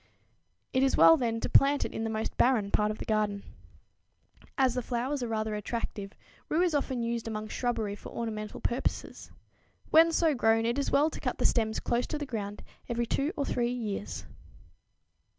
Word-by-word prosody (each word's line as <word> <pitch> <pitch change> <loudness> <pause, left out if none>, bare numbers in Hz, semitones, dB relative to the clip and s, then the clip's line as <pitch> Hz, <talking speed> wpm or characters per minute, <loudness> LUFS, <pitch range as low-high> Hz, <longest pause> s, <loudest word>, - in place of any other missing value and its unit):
It 260 - +3
is 270 0 +2
well, 325 - +8
then, 230 -6 -1
to - - -1
plant 280 +1 +4
it - - -6
in 225 - -3
the 225 - -1
most 220 0 -3
barren 225 -6 +2
part 210 0 +2
of 215 - -3
the - - -6
garden. 210 -2 0 1.1
As 260 -3 +3
the 250 - -1
flowers 255 +4 -2
are 240 - -2
rather 220 -1 -2
attractive, 210 -1 -4 0.4
rue 330 +3 +2
is 350 -3 +1
often 265 -4 -1
used 230 0 -2
among 215 -1 -4
shrubbery 225 -5 -2
for - - -10
ornamental 215 -2 -5
purposes. 240 +3 -3 0.6
When 330 +1 +7
so 325 -1 +3
grown 225 -3 +2
it 235 +4 0
is 280 - -1
well 300 +3 +3
to - - -7
cut - - -2
the - - -2
stems 220 -2 +2
close 240 +1 -1
to 305 - -3
the 295 - -4
ground 205 -5 -5 0.3
every 235 0 0
two 275 +6 0
or 285 - 0
three 240 -2 0
years. 195 - -4
235 Hz, 190 wpm, -29 LUFS, 215-270 Hz, 1.1 s, well